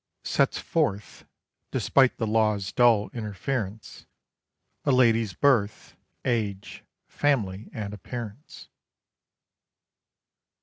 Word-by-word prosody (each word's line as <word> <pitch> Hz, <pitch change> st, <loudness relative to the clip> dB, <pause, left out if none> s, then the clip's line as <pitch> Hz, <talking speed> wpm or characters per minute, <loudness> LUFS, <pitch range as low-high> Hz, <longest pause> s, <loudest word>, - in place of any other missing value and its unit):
_Sets -, -, +1 dB
forth, 100 Hz, +1 st, -2 dB, 0.4 s
despite 135 Hz, -2 st, +2 dB
the 115 Hz, -, -1 dB
Law's 105 Hz, -2 st, +1 dB
dull 115 Hz, -4 st, +3 dB
interference, 110 Hz, 0 st, -5 dB, 0.8 s
A -, -, -1 dB
lady's 115 Hz, -5 st, +3 dB
birth, 115 Hz, -5 st, +1 dB, 0.3 s
age, 105 Hz, -5 st, -2 dB, 0.2 s
family, 110 Hz, -9 st, -1 dB
and 105 Hz, -2 st, -5 dB
appearance. 115 Hz, +4 st, -8 dB
110 Hz, 80 wpm, -26 LUFS, 100-120 Hz, 0.8 s, dull